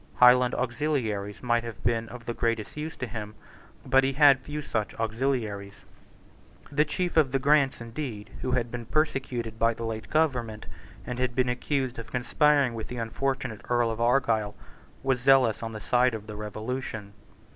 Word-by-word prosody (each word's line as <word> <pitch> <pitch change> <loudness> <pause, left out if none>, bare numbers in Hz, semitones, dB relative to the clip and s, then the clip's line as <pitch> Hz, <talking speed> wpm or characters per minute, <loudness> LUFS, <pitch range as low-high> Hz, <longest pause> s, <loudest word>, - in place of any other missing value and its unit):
Highland 125 0 +6
auxiliaries 120 -6 -2
might 120 -1 +2
have 115 -2 -8
been 115 -1 0
of 125 -1 -10
the 120 - -2
greatest 115 -3 -1
use 155 +2 -5
to - - -3
him: 110 -3 -6 0.5
but 135 0 +4
he 135 +1 +1
had 140 -1 +6
few 150 +3 -5
such 110 -6 -2
auxiliaries. 110 -4 -2 0.9
The 150 +2 +3
chief 175 +3 -2
of 145 -5 +4
the 135 - +2
Grants, 140 0 +3
indeed, 115 -3 -6
who 130 - -1
had 120 -2 0
been 120 -2 -6
persecuted 125 -7 -1
by 115 0 +3
the 115 - -5
late 110 -1 -5
government, 125 -9 0 0.4
and 125 0 -4
had 125 -1 0
been 130 -1 +2
accused 130 0 -1
of 115 - -9
conspiring 140 +1 +3
with 115 -1 -5
the 125 - -6
unfortunate 130 0 -2
Earl 120 -1 +2
of 115 +1 -4
Argyle, 115 -4 +2 0.5
was 130 -2 +1
zealous 130 -3 +4
on 115 -1 -4
the 110 - -6
side 125 +2 +2
of 105 -1 -7
the 105 -1 -8
Revolution. 110 0 -5
120 Hz, 175 wpm, -27 LUFS, 115-135 Hz, 0.9 s, Highland